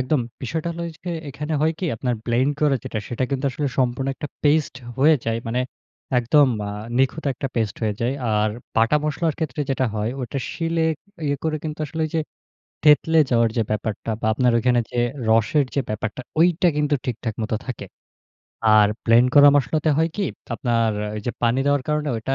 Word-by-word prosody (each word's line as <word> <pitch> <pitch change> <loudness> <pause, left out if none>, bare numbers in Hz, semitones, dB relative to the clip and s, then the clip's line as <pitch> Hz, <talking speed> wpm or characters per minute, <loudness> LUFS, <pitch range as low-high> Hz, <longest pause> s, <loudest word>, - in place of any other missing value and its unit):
একদম। 130 +2 +1 0.2
বিষয়টা 160 +6 -2
হইলো 170 0 -5
ওই 165 - -6
গে 180 - -3 0.2
এখানে 150 +3 -5
হয় 160 +1 +2
কি - - -3
আপনার 125 +2 -1
ব্লেন্ড 125 +4 +2
করে 150 -2 +3
যেটা 110 - -3
সেটা 120 +2 -1
কিন্তু 135 0 -2
আসলে 145 +2 -2
সম্পূর্ণ 130 +1 +1
একটা 145 - -6 0.2
পেইস্ট 150 -1 +3 0.2
হয়ে 150 +4 +6
যায়। 115 0 0
মানে 120 +2 0 0.6
একদম 140 +4 +4 0.2
আ - - -4 0.3
নিখুঁত 135 +4 +1
একটা 135 - -3
পেস্ট 110 -4 0
হয়ে 105 -2 0
যায়। 120 +3 0 0.2
আর 105 0 +2 0.3
বাটা 115 +6 +4
মসলার 155 +1 0
ক্ষেত্রে 150 -4 -3
যেটা 130 -1 +1
হয়, 105 +1 -1
ওইটা 130 +2 -3
শিলে 165 -1 0 0.4
ইয়ে 145 0 +1
করে 155 -1 0
কিন্তু 155 -1 -4
আসলে 160 +2 -5
ওই 155 - -3
যে 160 - +2 0.6
থেতলে 155 +2 +5
যাওয়ার 115 -2 +4
যে 115 - +3
ব্যাপারটা 110 +1 -3
বা - - -1
আপনার 125 +2 +2
ঐখানে 125 +1 +3
যে 120 - -2 0.3
রসের 115 +6 +3
যে 140 - +2
ব্যাপারটা 105 +2 -3 0.2
ঐটা 175 +1 +4
কিন্তু 150 0 +1
ঠিকঠাক 115 -2 -3
মতো 110 0 -1
থাকে। 130 -4 -5 0.9
আর 105 -1 +6 0.2
ব্লেন্ড 120 +2 +5
করা 145 0 +9
মশলাতে 155 +3 +1
হয় 160 +1 +2
কি 205 - 0 0.3
আপনার 115 -1 +1 0.2
আ - - -4
ওইযে 105 +3 -3
পানি 120 +2 +2
দেওয়ার 145 -1 +2
কারণে 150 0 0
ঐটা 115 +4 -2
130 Hz, 190 wpm, -22 LUFS, 115-150 Hz, 0.9 s, করা